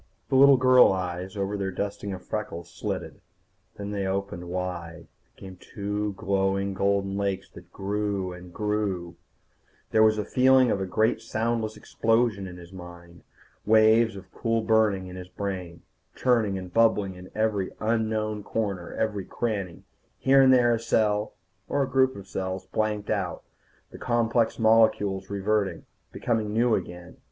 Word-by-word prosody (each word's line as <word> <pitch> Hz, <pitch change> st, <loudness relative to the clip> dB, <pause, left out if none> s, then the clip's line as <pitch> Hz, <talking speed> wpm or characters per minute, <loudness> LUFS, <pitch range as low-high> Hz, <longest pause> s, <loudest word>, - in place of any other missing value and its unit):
The -, -, +1 dB
little 140 Hz, 0 st, +7 dB
girl 130 Hz, -2 st, +6 dB
eyes 90 Hz, +1 st, -4 dB
over 100 Hz, +1 st, -2 dB
their 100 Hz, -1 st, -2 dB
dusting 100 Hz, +2 st, -4 dB
of 95 Hz, -1 st, -7 dB
freckles 105 Hz, -6 st, -5 dB
slitted. -, -, -5 dB, 0.6 s
Then 100 Hz, 0 st, -5 dB
they 100 Hz, -2 st, -2 dB
opened 95 Hz, -2 st, -3 dB
wide, 85 Hz, -2 st, -5 dB, 0.3 s
became 95 Hz, -1 st, -11 dB
two 105 Hz, +2 st, -4 dB
glowing 95 Hz, 0 st, 0 dB
golden 100 Hz, 0 st, 0 dB
lakes 100 Hz, -1 st, -2 dB
that -, -, -14 dB
grew, 100 Hz, -2 st, -2 dB
and 90 Hz, 0 st, -11 dB
grew 100 Hz, -4 st, -2 dB, 0.8 s
There 110 Hz, -, +4 dB
was 110 Hz, 0 st, +5 dB
the 105 Hz, -, -2 dB
feeling 130 Hz, -1 st, +4 dB
of 100 Hz, -, 0 dB
a 95 Hz, -, -2 dB
great 110 Hz, +4 st, +1 dB
soundless 110 Hz, -1 st, -2 dB
explosion 115 Hz, -4 st, 0 dB
in 90 Hz, -1 st, -9 dB
his 90 Hz, +1 st, -13 dB
mind. 85 Hz, -1 st, -12 dB, 0.4 s
Waves 110 Hz, +1 st, +4 dB
of 95 Hz, -1 st, -11 dB
cool 115 Hz, -1 st, -1 dB
burning 110 Hz, -4 st, +2 dB
in 90 Hz, 0 st, -9 dB
his 90 Hz, -1 st, -8 dB
brain, 95 Hz, -4 st, -5 dB, 0.3 s
churning 115 Hz, -6 st, +1 dB
and 90 Hz, -1 st, -8 dB
bubbling 110 Hz, -4 st, +3 dB
in 90 Hz, 0 st, -12 dB
every 105 Hz, -3 st, 0 dB
unknown 110 Hz, -1 st, -1 dB
corner, 100 Hz, -5 st, -3 dB
every 105 Hz, -4 st, -2 dB
cranny. 100 Hz, -7 st, -3 dB, 0.3 s
Here 135 Hz, +1 st, +5 dB
and 130 Hz, -1 st, +6 dB
there 120 Hz, -2 st, +5 dB
a 115 Hz, -, 0 dB
cell, 110 Hz, -2 st, 0 dB, 0.3 s
or 140 Hz, -, +1 dB
a -, -, -2 dB
group 130 Hz, 0 st, +2 dB
of 100 Hz, -1 st, -10 dB
cells, 95 Hz, 0 st, -4 dB
blanked 105 Hz, -1 st, -2 dB
out, 95 Hz, -5 st, -2 dB, 0.5 s
the -, -, -11 dB
complex 120 Hz, -1 st, +1 dB
molecules 110 Hz, -4 st, +3 dB
reverting, 100 Hz, 0 st, -1 dB, 0.3 s
becoming 110 Hz, -3 st, -1 dB
new 115 Hz, +2 st, +2 dB
again. 90 Hz, -2 st, -4 dB
100 Hz, 155 wpm, -26 LUFS, 95-110 Hz, 0.8 s, little